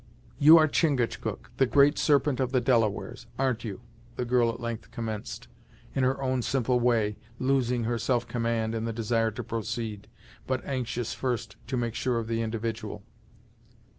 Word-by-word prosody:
"You 155 +3 +9
are 155 -1 +6
Chingachgook, 140 -6 0
the 135 - +4
Great 145 +3 +5
Serpent 140 -3 +3
of 130 -1 0
the 130 - +3
Delawares, 115 -1 0
ar'n't 130 -4 0
you?" 105 -4 -6 0.3
the 125 - -2
girl 120 -1 +3
at 115 - -4
length 115 -2 -5
commenced, 110 -2 -5 0.5
in 135 - +1
her 130 +1 +1
own 130 -1 +1
simple 125 0 +1
way 115 -4 +2 0.2
losing 125 -2 +1
her 115 +1 -1
self 120 0 0
command 115 -1 -1
in 115 0 -2
the 115 - -2
desire 115 0 +1
to 110 +3 -6
proceed, 110 -2 -4 0.4
but 130 -1 -1
anxious 125 -3 -2
first 120 -5 -3
to 130 +1 -1
make 120 -2 -1
sure 120 +1 0
of 115 - -2
the 115 0 -1
individual. 115 0 -4
120 Hz, 165 wpm, -28 LUFS, 115-130 Hz, 0.5 s, You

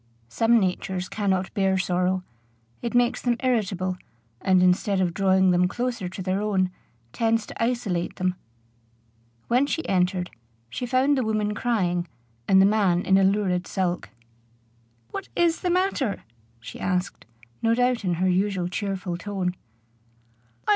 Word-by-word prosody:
Some 230 - +3
natures 185 -1 -2
cannot 190 -2 -1
bear 195 -2 +2
sorrow: 185 0 0 0.6
it 235 0 -3
makes 245 0 +2
them 240 -1 +1
irritable, 190 -7 0 0.4
and, 185 -1 +4
instead 185 +2 +2
of 180 -2 +1
drawing 190 -1 +3
them 180 0 +3
closer 240 -2 -3
to 190 +1 -7
their 190 +2 -1
own, 190 -3 +1 0.4
tends 225 -1 +1
to - - -4
isolate 230 -8 -1
them. 185 0 0 1.1
When 255 +4 +3
she 325 +3 -2
entered, 180 -1 0 0.4
she 245 - -4
found 265 +3 +2
the - - +1
woman 215 -1 0
crying, 180 -7 0 0.4
and 190 - +6
the 190 - +7
man 195 -4 +2
in 190 0 +4
a - - +4
lurid 190 -2 +1
sulk. 180 -2 -2 1.0
"What - - -6
is 340 -1 +2
the 360 - 0
matter?" 355 - 0 0.4
she 115 - -10
asked, 180 -1 -2 0.3
no 230 0 +3
doubt 245 -1 +1
in 180 -3 0
her 185 +3 +1
usual 185 -1 +1
cheerful 190 -2 -3
tone. 185 -1 -3
195 Hz, 145 wpm, -25 LUFS, 180-230 Hz, 1.1 s, the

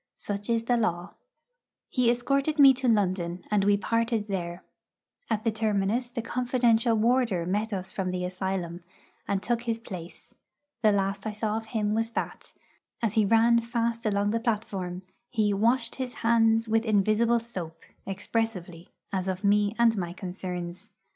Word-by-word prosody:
Such 205 +1 -5
is 230 -1 +1
the 240 +1 +2
law. 175 -5 -1 0.7
He 250 -3 +2
escorted 275 +5 +1
me 275 -2 +9
to 260 0 -2
London, 185 -5 +1
and 205 -2 +3
we 200 0 +4
parted 230 +1 0
there. 175 -2 -4 0.7
At 215 -1 0
the 225 - +2
terminus 220 +2 0
the 240 -2 -4
confidential 240 -1 +2
warder 225 -5 +2
met 210 +5 -1
us 190 -1 -4
from 190 -2 -2
the 180 0 -2
asylum, 180 -2 -3 0.4
and 195 -1 -1
took 240 -1 0
his 230 -2 -1
place. 180 -7 -10 0.5
The 215 -2 +5
last 195 +1 -1
I 215 - -3
saw 210 0 -2
of 225 0 -4
him 215 -2 -1
was 225 +1 0
that, - - -4 0.5
as 220 -3 +1
he 220 -2 +3
ran 230 +2 +5
fast 230 0 -1
along 205 0 +1
the 230 - 0
platform, 200 -6 -3 0.3
he 215 -4 +1
'washed 230 +4 +1
his 255 -2 -4
hands 225 -1 +4
with 225 +1 +2
invisible 215 +2 +3
soap,' 180 -9 -7 0.2
expressively, 195 -4 -3 0.2
as 190 -1 -1
of 190 +1 -3
me 205 +1 +3
and 235 -1 +4
my 175 -2 -3
concerns. 180 -1 -6
215 Hz, 160 wpm, -27 LUFS, 190-230 Hz, 0.7 s, me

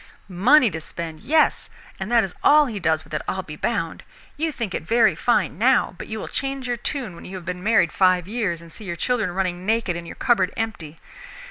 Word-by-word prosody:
"Money 225 +7 +4
to 160 0 -5
spend? 160 0 -7
Yes, 305 +7 +2 0.3
and 195 +4 -4
that 235 -2 +5
is 190 -3 -4
all 300 0 +6
he 225 -6 -4
does 160 -3 +1
with - - -16
it 155 - -1
I'll 190 - -2
be 150 - -9
bound. 165 -2 -2 0.3
You 315 +2 -1
think 230 -9 -4
it - - -2
very 225 +7 +3
fine 200 -9 0
now, 255 -2 +3
but - - -7
you 220 - -5
will - - -6
change 270 -1 -3
your 245 - 0
tune 245 - -3
when 170 - -12
you 190 - -8
have 180 -2 -8
been 180 0 -4
married 210 -5 +3
five 185 -2 +3
years 200 -7 -2
and 165 - -14
see 215 - -10
your 175 -2 -4
children 225 +2 0
running 180 -1 -2
naked 220 -3 0
and 170 0 -6
your - - -8
cupboard 200 -7 +2
empty. 180 -9 -4
195 Hz, 230 wpm, -23 LUFS, 175-235 Hz, 0.3 s, all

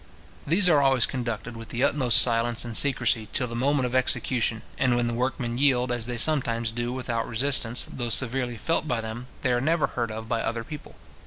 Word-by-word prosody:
These 180 +5 +3
are 155 -5 +4
always 135 -3 +3
conducted 115 -2 -5
with 115 0 -10
the 120 +2 -2
utmost 130 -4 +4
silence 115 0 0
and 115 -2 -6
secrecy 120 -5 +1
till 125 - +1
the 120 -1 -6
moment 135 +2 +1
of 125 - -4
execution; 125 -3 0 0.2
and 130 -2 +2
when 120 0 +1
the 120 - -2
workmen 120 0 -2
yield, 130 -3 +2
as 120 -2 +1
they 120 -1 -4
sometimes 115 -5 +1
do 120 +1 -3
without 120 -3 -3
resistance, 120 0 +1
though 120 -2 -4
severely 120 0 +1
felt 165 +7 -1
by 125 -4 -1
them, 110 +2 -7 0.2
they 130 - +1
are 120 - 0
never 160 +3 +1
heard 120 -2 -3
of 110 +1 -7
by 115 -1 -1
other 115 0 -3
people. 150 +5 -10
120 Hz, 210 wpm, -25 LUFS, 115-130 Hz, 0.2 s, are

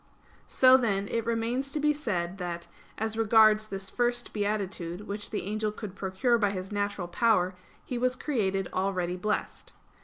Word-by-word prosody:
So, 260 0 +6
then, 200 -5 0
it 230 -1 -2
remains 235 +4 -1
to 305 - -1
be 300 0 +3
said, 195 -10 -3
that, 170 -1 -4 0.3
as 220 0 -2
regards 215 -1 +5
this 195 -1 -6
first 240 0 0
beatitude, 200 -4 -2
which 205 0 -4
the 215 - -3
angel 215 +2 -1
could 210 -2 -8
procure 200 +6 +1
by 205 -2 +3
his 190 0 -5
natural 205 -3 -2
power, 185 -1 +2 0.3
he 245 - -3
was 255 +1 +1
created 195 -11 -1
already 185 -2 -1
blessed. 210 +3 -3
210 Hz, 160 wpm, -28 LUFS, 190-230 Hz, 0.3 s, So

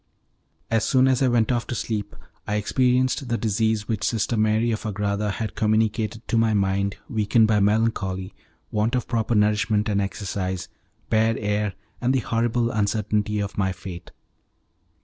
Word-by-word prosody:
As 115 -1 +2
soon 130 -1 +4
as 130 0 +2
I 135 - +4
went 120 -1 +2
off 120 -1 -1
to - - -3
sleep 105 -2 -3 0.3
I 105 - -1
experienced 125 +5 +1
the 115 - +1
disease 110 -1 0
which 110 -4 -2
Sister 115 +1 0
Mary 110 +2 +2
of 110 - -2
Agrada 105 -1 -1
had 110 -1 -3
communicated 110 +1 0
to 115 - +2
my 110 -1 +2
mind 100 0 0
weakened 110 -1 +3
by 105 -1 +3
melancholy, 100 -3 0 0.4
want 110 +4 +1
of 125 - -1
proper 115 -1 0
nourishment 105 0 +2
and 100 -2 +1
exercise, 95 -2 -3 0.4
bad 110 +1 +3
air, 105 -1 -1 0.3
and 125 +2 +2
the - - +3
horrible 115 +1 0
uncertainty 105 0 0
of 100 0 -3
my 95 -1 +1
fate. 90 -1 -8
110 Hz, 160 wpm, -24 LUFS, 105-115 Hz, 0.4 s, soon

